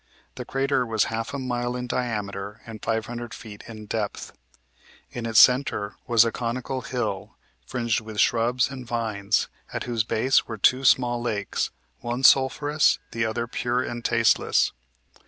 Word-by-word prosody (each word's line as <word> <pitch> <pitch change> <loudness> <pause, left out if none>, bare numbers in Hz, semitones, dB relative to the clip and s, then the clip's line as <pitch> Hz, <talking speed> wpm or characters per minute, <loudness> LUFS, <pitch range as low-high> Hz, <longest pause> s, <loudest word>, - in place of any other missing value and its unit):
The - - -7
crater 135 -1 0
was 110 -3 +1
half 115 +2 -3
a 140 - -4
mile 120 -2 -2
in 125 0 -3
diameter 105 -4 -3
and 110 -3 -9
five 110 0 -1
hundred 120 -1 -6
feet 105 -3 -11
in 110 -2 -9
depth. 105 -1 -4 0.8
In 120 -1 -4
its 110 -1 +5
centre 125 -6 +4
was 115 -1 +5
a 115 - 0
conical 125 +3 -3
hill, 115 -6 -4 0.3
fringed 120 -2 -1
with 110 -1 -7
shrubs 120 +3 +2
and 130 -2 -7
vines; 110 -4 -1 0.2
at - - -3
whose 115 -3 0
base 115 +4 +2
were 110 - -5
two 130 +6 +3
small 120 -2 +3
lakes, 105 -4 -2 0.3
one 120 +2 -4
sulphurous, 145 +3 +4
the 115 0 -1
other 115 +1 -2
pure 120 +1 -1
and 120 -1 -5
tasteless. - - +3
120 Hz, 155 wpm, -25 LUFS, 110-125 Hz, 0.8 s, its